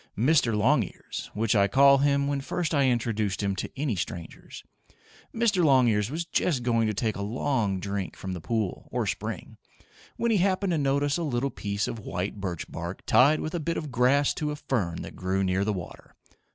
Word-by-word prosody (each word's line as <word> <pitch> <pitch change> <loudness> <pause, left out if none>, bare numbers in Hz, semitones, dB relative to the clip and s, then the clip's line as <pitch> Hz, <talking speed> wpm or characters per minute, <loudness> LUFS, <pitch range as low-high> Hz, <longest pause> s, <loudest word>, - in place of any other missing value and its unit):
Mr. 125 -2 +3
Longears, 120 0 0
which 110 0 +1
I 100 -1 +4
call 140 +3 +6
him 140 0 +2
when 140 -1 -1
first 165 +4 -2
I 140 -3 +3
introduce 110 -5 0
him 100 0 -1
to - - -3
any 140 -7 0
strangers 85 -2 -7 0.7
Mr. 225 -6 +2
Longears 120 -8 +4
was 165 +4 -3
just 155 -5 0
going 115 -2 +2
to 110 - 0
take 110 +1 -1
a 100 - -5
long 110 -2 -1
drink 100 -3 -4
from 95 - -6
the 90 - -6
pool, 110 -1 -3
or - - -1
spring, - - -5 0.6
when 235 0 +1
he 215 - +3
happened 190 0 +1
to 165 - +1
notice 140 +1 +1
a - - -1
little 135 -2 -1
piece 100 0 -2
of 115 - -5
white 100 0 -4
birch 90 -4 -4
bark 85 +3 -7
tied 145 +5 +5
with 155 - -4
a 175 - -1
bit 165 +2 -2
of 150 -3 -5
grass 130 +4 +3
to 150 - -3
a 150 - -3
fern 115 - -2
that - - -9
grew 95 +1 -1
near 95 +1 +1
the 105 - 0
water. 90 -6 -8
120 Hz, 200 wpm, -27 LUFS, 100-145 Hz, 0.7 s, call